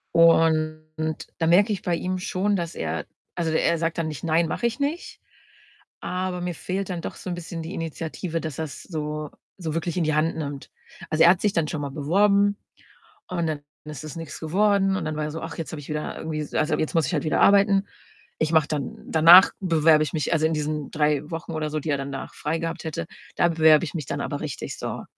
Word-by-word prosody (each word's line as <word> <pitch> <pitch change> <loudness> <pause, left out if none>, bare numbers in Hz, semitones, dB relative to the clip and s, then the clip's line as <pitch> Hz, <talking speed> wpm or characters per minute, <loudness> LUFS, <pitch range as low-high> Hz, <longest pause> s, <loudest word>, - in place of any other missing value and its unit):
Und 160 -1 +4 0.5
da 165 - 0
merke 195 +5 +5
ich 195 - -4
bei 175 -1 0
ihm 185 +2 -2
schon, 190 +3 0
dass 170 -3 -3
er 80 +1 -3 0.3
also, 165 -2 -1
er 165 +1 +2
sagt 165 0 -1
dann 165 -1 -1
nicht: 150 - -7
„Nein, 165 0 +2
mache - - -2
ich 235 +4 -4
nicht“, 305 +5 -3 0.8
aber 180 0 -3
mir 175 0 -2
fehlt 190 +4 -3
dann 180 -2 -3
doch - - -6
so - - -7
'n 175 - -2
bisschen 170 -1 -6
die 165 - -6
Initiative, 165 +1 -4
dass 155 -3 -5
er's 155 -3 -5
so 150 -3 -4 0.3
so 165 -5 -4
wirklich 165 +1 -2
in 175 - +2
die 155 - +1
Hand 160 +2 +1
nimmt. 145 -3 -6 0.4
Also, 155 0 +3
er - - +8
hat 185 - 0
sich 205 -2 +1
dann 160 -2 +1
schon 155 -2 -3
mal 140 - -4
beworben 200 +7 +3 0.7
und 170 -3 -1
dann 155 -2 -2 0.3
ist 150 -1 -7
es 155 -3 -7
nix 165 - -7
geworden. 195 +3 +2
Und - - -3
dann 155 - -2
war 150 - -1
er 150 - -4
so: 165 - -6
„Ach, - - -6
jetzt 165 - -5
habe 150 - -5
ich - - -13
wieder 150 0 -3
irgendwie 160 -1 -4
s 150 - -7
also, 155 +1 +1
jetzt 155 - -2
muss 160 -5 +3
ich - - -3
halt 150 - 0
wieder 155 - +1
arbeiten. 200 0 +5 0.5
Ich 155 0 +1
mache 155 -2 +4
dann 145 -4 -3
danach 170 +4 +8
bewerbe 160 -4 +4
ich 150 - -4
mich“ 155 - -1
also 160 -1 +2
in 160 - +2
diesen 150 -1 -2
3 150 -1 +1
Wochen 165 +1 -5
oder 155 -1 -2
so, 155 - -1
die 155 - -5
er 140 - +2
danach 135 0 -6
frei 160 +2 -2
gehabt 165 +1 -4
hätte: 160 +1 -3 0.3
„Da 175 - +3
bewerbe 160 -1 +5
ich - - -7
mich 155 -5 -3
dann - - -3
aber - - -3
richtig, - - -5
so.“ - - -4
160 Hz, 235 wpm, -24 LUFS, 155-175 Hz, 0.8 s, er